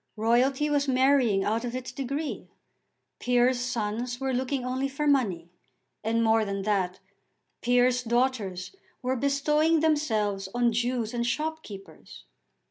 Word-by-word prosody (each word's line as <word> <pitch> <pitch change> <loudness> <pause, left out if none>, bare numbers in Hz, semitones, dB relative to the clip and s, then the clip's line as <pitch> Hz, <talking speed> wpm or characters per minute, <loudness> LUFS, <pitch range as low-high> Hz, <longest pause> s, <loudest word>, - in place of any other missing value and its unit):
Royalty 250 +6 +2
was 290 -1 +1
marrying 255 -6 +3
out 225 +4 0
of 245 0 -4
its 255 -1 -5
degree. 275 +4 -4 0.7
Peers' 245 0 +2
sons 240 0 -3
were 265 -1 -1
looking 255 +1 -1
only 260 +2 -1
for 275 +2 -3
money. 200 - +1 0.5
And, 230 +1 +1
more 225 0 +3
than 200 -1 -3
that, 190 -3 0 0.6
peers' 245 +1 +3
daughters 235 - -1 0.3
were 255 +1 0
bestowing 300 +4 +2
themselves 215 -11 0
on 240 -1 +2
Jews 240 -1 -1
and 240 -1 -1
shopkeepers. 240 -6 -5
245 Hz, 130 wpm, -27 LUFS, 220-270 Hz, 0.7 s, marrying